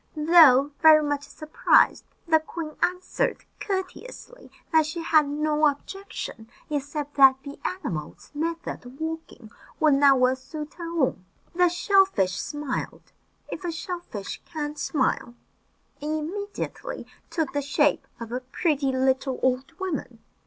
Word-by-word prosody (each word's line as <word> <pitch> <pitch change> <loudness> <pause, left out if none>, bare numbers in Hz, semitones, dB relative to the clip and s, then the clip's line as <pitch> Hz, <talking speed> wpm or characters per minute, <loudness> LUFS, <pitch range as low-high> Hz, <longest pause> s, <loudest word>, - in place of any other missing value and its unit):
Though 300 -4 +6
very 310 -1 +8
much 290 -1 -2
surprised, 310 +1 +2 0.2
the 320 -1 +5
queen 315 -1 -7
answered 360 +1 -1
courteously 425 +5 -6 0.2
that 315 -2 +4
she 330 +2 -5
had 310 -3 +4
no 300 +1 +2
objection, 290 - -5 0.2
except 290 0 -3
that 270 -1 +8
the 285 -1 -9
animal's 165 - -5
method 330 +2 -4
of 250 +2 -13
walking 320 -8 -6 0.3
would 310 -2 +5
not 275 -1 +5
well 255 +1 +4
suit 300 +3 -8
her 335 -1 -7
own. 250 -9 0 0.3
The 355 0 +4
shell 385 +3 +4
fish 195 - -1
smiled 295 -2 -5 0.4
if - - -6
a 350 - -2
shell 345 +2 -5
fish 205 - -7
can 300 -3 -5
smile 260 -5 -1 0.7
and 305 +1 -1
immediately 415 +5 -5 0.2
took 320 -5 -2
the 290 - 0
shape 290 +1 +1
of 230 -1 -7
a 250 - -2
pretty 275 +2 0
little 260 0 0
old 260 +4 +1
woman. 325 -11 -4
300 Hz, 140 wpm, -25 LUFS, 270-335 Hz, 0.7 s, very